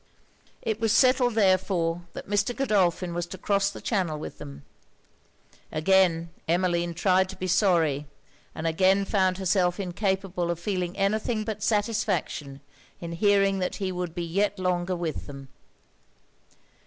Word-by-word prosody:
It 220 -1 -2
was 225 -1 +1
settled 255 -1 +4
therefore 185 -4 +1
that - - -8
Mr. 205 +4 0
Godolphin 185 -8 +1
was 175 0 -3
to 190 - -8
cross 200 +1 +1
the 200 - -9
channel 185 -8 -1
with 150 - -8
them. 70 0 -10 1.1
Again 170 0 +2 0.2
Emmeline 175 0 +1
tried 185 +1 +2
to 190 - -7
be 185 - -5
sorry, 170 -6 +2 0.5
and 160 - -5
again 190 +4 +3
found 190 -3 +1
herself 185 -1 +1
incapable 190 -1 -2
of 170 -1 -2
feeling 180 0 -3
any 200 +2 +2
thing 220 -1 -2
but 215 -1 -5
satisfaction 205 -10 -1 0.4
in 170 -1 -6
hearing 195 +2 +2
that 180 - -2
he 190 -2 -3
would 180 -2 -4
be 175 - -3
yet 200 +5 0
longer 180 0 -1
with 170 -3 -4
them. 135 -2 -10
185 Hz, 145 wpm, -26 LUFS, 170-200 Hz, 1.1 s, settled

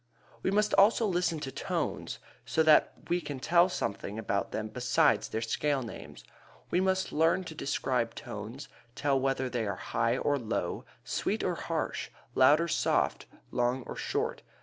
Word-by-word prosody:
We - - 0
must 210 +2 +2
also 215 +3 +5
listen 175 -4 0
to 135 - -4
tones - - -3 0.3
so 160 - +1
that 155 -1 +5
we 175 +1 +1
can 145 -5 -5
tell 170 +6 +4
something 100 - -3
about 100 -3 -1
them 110 0 -3
besides 125 +2 +2
their 110 +1 -2
scale 140 +4 0
names. 115 - -9 0.5
We 180 - +3
must 190 0 +1
learn 165 +4 +3
to 165 - -8
describe 125 -5 -1
tones, 120 +2 -7 0.3
tell 140 -2 +1
whether 130 0 0
they 120 -3 -2
are 100 - -2
high 115 +2 0
or 145 +1 +1
low, 115 -2 -3 0.2
sweet - - -1
or - - +1
harsh, - - -3 0.2
loud 135 +4 +6
or 170 - 0
soft, - - +1 0.2
long 125 +1 0
or - - -7
short. - - -2
135 Hz, 165 wpm, -30 LUFS, 120-170 Hz, 0.5 s, loud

